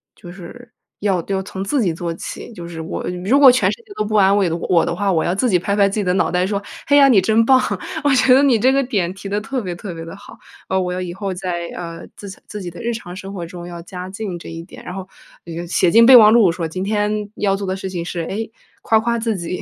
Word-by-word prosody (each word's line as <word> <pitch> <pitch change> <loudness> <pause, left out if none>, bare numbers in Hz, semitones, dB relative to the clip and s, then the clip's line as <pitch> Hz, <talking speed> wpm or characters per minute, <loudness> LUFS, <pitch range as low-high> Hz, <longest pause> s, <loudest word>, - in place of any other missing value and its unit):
就 175 -4 -12
是 235 +7 -12 0.3
要 190 -5 0
要 195 -1 -1
从 190 -1 -6
自 245 +7 0
己 175 -6 +1
做 170 0 -4
起。 165 - -8
就 170 -3 -8
是 165 -1 -8
我 160 - -5 0.2
如 265 +8 +4
果 275 -3 +9
全 250 - +2
世 - - -5
界 420 -2 -13
都 210 - -1
不 215 - -2
安 195 -1 +5
慰 195 -3 +2
的 165 - -2
我 170 0 +2
的 170 - -2
话， 200 +1 0
我 160 -3 +1
要 175 - 0
自 250 +4 +1
己 180 -3 +3
拍 200 +3 -1
拍 200 -1 +4
自 195 - -5
己 - - 0
的 180 - +1
脑 185 - +1
袋 180 0 +1
说： 200 0 -2 0.3
“哎 285 - +4
呀， 275 - +7
你 220 - +6
真 220 +4 +3
棒。” 260 +1 +6 0.4
我 290 - +3
觉 255 0 +5
得 265 - +6
你 260 -5 +4
这 260 +4 +4
个 275 +1 +2
点 195 -8 -1
提 195 +1 -9
得 205 - 0
特 255 +3 -3
别 180 -3 -5
特 175 0 -7
别 165 0 -8
地 165 - -9
好， 200 - -14 0.3
呃， 190 - +1
我 180 -1 -2
要 185 - -3
以 175 -1 -5
后 195 0 -4
在， 175 -1 -4
呃， 170 -1 -7
自 200 - -9
洽 190 - -11
自 210 -1 -7
己 175 - -6
的 175 - -10
日 235 0 -2
常 180 -6 -8
生 195 +1 -8
活 175 -4 -5
中 175 0 -9
要 170 -1 -8
加 180 +1 -8
进 195 -3 -5
这 - - -10
一 165 0 -7
点， 175 - -13
然 180 - -6
后， 190 -1 -7 0.4
呃， 170 +1 -6
写 175 0 +2
进 230 +1 +7
备 260 - +9
忘 215 -3 +9
录 220 -7 +5
说： 165 -1 -3
“今 185 +4 -5
天 210 0 -1
要 195 -1 +1
做 195 -1 -5
的 185 - -1
事 190 0 -6
情 175 -2 -4
是， 175 -1 -4
诶， 215 +6 -4 0.3
夸 220 -1 +3
夸 235 +1 -1
自 225 -2 -1
己。” 170 +1 -5
195 Hz, 310 characters per minute, -19 LUFS, 175-220 Hz, 0.4 s, 果